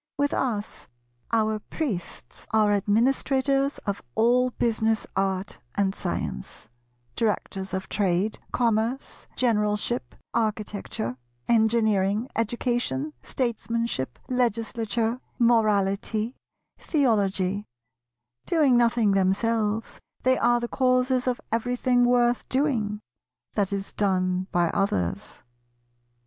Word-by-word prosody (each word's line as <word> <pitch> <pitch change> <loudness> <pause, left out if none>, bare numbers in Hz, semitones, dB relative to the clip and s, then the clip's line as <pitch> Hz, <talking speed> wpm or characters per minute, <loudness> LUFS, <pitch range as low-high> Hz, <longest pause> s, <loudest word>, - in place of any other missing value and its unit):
With 285 0 +1
us, 215 -5 -2 0.4
our 220 -1 +2
Priests 215 - -5
are 215 -1 +3
Administrators 265 +6 +2
of 200 -2 -2
all 250 +3 +4
Business, 225 -2 0
Art, 195 0 -1 0.2
and 195 -1 +1
Science; 65 - -5 0.5
Directors 195 -3 -1
of 190 0 -3
Trade, 195 +1 0
Commerce, 235 +2 -1
Generalship, 210 0 0 0.2
Architecture, 210 - -2 0.3
Engineering, 220 -1 +2
Education, 230 - -1
Statesmanship, 230 - -2
Legislature, 230 -1 0 0.2
Morality, 215 -1 +2 0.4
Theology; 205 - +1 0.8
doing 300 -7 +4
nothing 235 -3 +3
themselves, 210 +3 0 0.2
they 260 0 +4
are 240 0 +3
the 240 - -3
Causes 255 0 +2
of 250 -1 0
everything 245 +2 +2
worth 245 0 +2
doing, 235 -7 0 0.5
that 200 -2 0
is 200 0 -3
done 185 -2 0
by 175 -1 +2
others. 95 - -1
220 Hz, 90 wpm, -26 LUFS, 200-245 Hz, 0.8 s, all